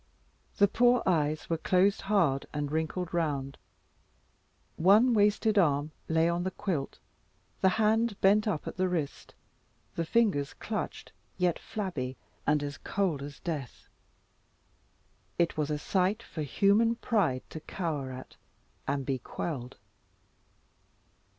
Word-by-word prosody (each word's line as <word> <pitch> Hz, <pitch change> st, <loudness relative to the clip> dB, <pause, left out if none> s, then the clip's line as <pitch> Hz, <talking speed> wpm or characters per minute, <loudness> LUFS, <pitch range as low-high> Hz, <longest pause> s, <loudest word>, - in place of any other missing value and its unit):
The 200 Hz, -, +6 dB
poor 245 Hz, +4 st, +3 dB
eyes 155 Hz, -4 st, +1 dB
were 165 Hz, -1 st, -1 dB
closed, 190 Hz, +4 st, +3 dB
hard, 165 Hz, -10 st, +2 dB
and 145 Hz, -1 st, -2 dB
wrinkled 160 Hz, +3 st, -2 dB
round; 140 Hz, -5 st, -1 dB, 1.2 s
one 210 Hz, +9 st, +5 dB
wasted 210 Hz, 0 st, +3 dB
arm 150 Hz, -3 st, +2 dB, 0.2 s
lay 160 Hz, 0 st, +3 dB
on 170 Hz, +1 st, 0 dB
the 185 Hz, -, 0 dB
quilt, 175 Hz, -7 st, -3 dB, 0.6 s
the 190 Hz, -, +5 dB
hand 220 Hz, 0 st, +2 dB
bent 210 Hz, +3 st, +4 dB
up 180 Hz, -8 st, -2 dB
at -, -, -6 dB
the 185 Hz, 0 st, +1 dB
wrist, 160 Hz, -6 st, -4 dB, 0.6 s
the 170 Hz, -, -1 dB
fingers 165 Hz, -7 st, +1 dB
clutched -, -, -5 dB, 0.3 s
yet 180 Hz, -2 st, +1 dB
flabby, 155 Hz, -, -4 dB, 0.3 s
and 150 Hz, -1 st, +3 dB
as 145 Hz, 0 st, -5 dB
cold 185 Hz, -8 st, -1 dB
as 140 Hz, 0 st, -8 dB
death. 150 Hz, -8 st, -5 dB, 1.5 s
It 170 Hz, -1 st, +1 dB
was 150 Hz, -1 st, -1 dB
a 150 Hz, -, 0 dB
sight 190 Hz, +7 st, 0 dB
for 160 Hz, -, -6 dB
human 205 Hz, -, +3 dB
pride 185 Hz, -, 0 dB
to 160 Hz, -, -6 dB
cower 155 Hz, -5 st, -3 dB
at, 130 Hz, 0 st, -10 dB, 0.5 s
and 140 Hz, -1 st, -1 dB
be 135 Hz, -1 st, -1 dB
quelled. 130 Hz, -3 st, -5 dB
170 Hz, 130 wpm, -30 LUFS, 145-200 Hz, 1.5 s, The